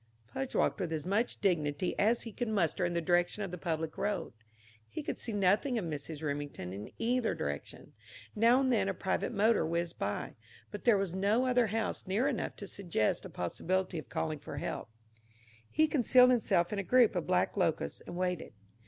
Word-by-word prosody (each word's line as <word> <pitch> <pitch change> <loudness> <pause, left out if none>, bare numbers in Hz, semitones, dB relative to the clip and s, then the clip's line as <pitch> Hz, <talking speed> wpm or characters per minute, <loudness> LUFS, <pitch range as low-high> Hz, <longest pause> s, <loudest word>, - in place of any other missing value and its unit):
Pudge 270 - -4
walked - - +2
with 180 -4 -2
as 155 -1 -3
much 205 +6 0
dignity 170 -4 +1
as 225 +4 +3
he 230 - -7
could 240 +3 -3
muster 195 -4 +1
in 175 - -1
the 170 -1 -1
direction 175 +4 +1
of 195 - -4
the 180 - -5
public 160 -2 -3
road. 205 - -2 0.6
He 110 - -5
could - - -4
see 230 - -4
nothing 205 +6 +2
of 210 - -2
Mrs. 155 0 -5
Remington 145 -11 -4
in 100 +2 -7
either 245 0 +1
direction; 70 0 -5 0.4
now 235 +4 +5
and 260 -2 +2
then 210 -3 +2
a 195 - -2
private 190 - -1
motor 220 +1 +3
whizzed 170 +1 -2
by, 100 +1 -2 0.4
but 205 - -7
there 235 -4 +6
was 195 -3 -1
no 205 +6 +2
other 250 -2 +3
house 215 -1 -2
near 210 +8 +1
enough 275 -5 -2
to 200 - -8
suggest 175 - -1
a - - -7
possibility 185 - -2
of - - -11
calling 155 -2 -2
for - - -8
help. - - -4 0.8
He 315 - +3
concealed 255 -3 +5
himself 210 -7 +2
in 205 - -1
a - - -1
group 250 +3 +4
of - - -2
black - - +2
locusts - - 0
and 175 - -6
waited. 180 -2 -2
195 Hz, 195 wpm, -32 LUFS, 165-225 Hz, 0.8 s, there